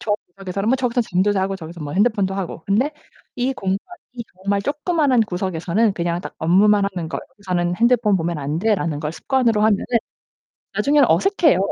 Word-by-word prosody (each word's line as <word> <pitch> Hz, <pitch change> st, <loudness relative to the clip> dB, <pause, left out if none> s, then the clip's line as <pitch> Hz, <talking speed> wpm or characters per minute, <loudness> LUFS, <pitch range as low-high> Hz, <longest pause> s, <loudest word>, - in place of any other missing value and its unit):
저 210 Hz, -, -1 dB, 0.2 s
구석에서는 195 Hz, +2 st, -3 dB
뭐 260 Hz, -, +3 dB
저기서는 245 Hz, -2 st, 0 dB
잠도 190 Hz, +3 st, +2 dB
자고 195 Hz, 0 st, -1 dB
저기서 170 Hz, -1 st, -10 dB
뭐 145 Hz, -1 st, -5 dB
핸드폰도 200 Hz, -1 st, +2 dB
하고 185 Hz, -4 st, -5 dB
근데 250 Hz, +10 st, +1 dB, 0.4 s
이 255 Hz, +2 st, 0 dB
공간 195 Hz, -5 st, -2 dB, 0.3 s
이 245 Hz, -, -6 dB
정말 200 Hz, +1 st, -1 dB
조그만한 290 Hz, -, +1 dB
구석에서는 190 Hz, +2 st, 0 dB
그냥 170 Hz, -1 st, -1 dB
딱 -, -, -8 dB
업무만 200 Hz, +5 st, +4 dB
하는 170 Hz, -3 st, -4 dB
거 -, -, -3 dB
'여기서는 180 Hz, -6 st, -2 dB
핸드폰 235 Hz, -4 st, +3 dB
보면 170 Hz, -1 st, -2 dB
안 145 Hz, +3 st, -2 dB
돼.'라는 180 Hz, -9 st, 0 dB
걸 150 Hz, 0 st, -3 dB
습관으로 235 Hz, -1 st, +1 dB
하면은 215 Hz, -2 st, +3 dB, 0.9 s
나중에는 285 Hz, -2 st, +3 dB
어색해요. 370 Hz, -, +3 dB
200 Hz, 410 characters per minute, -21 LUFS, 180-235 Hz, 0.9 s, 업무만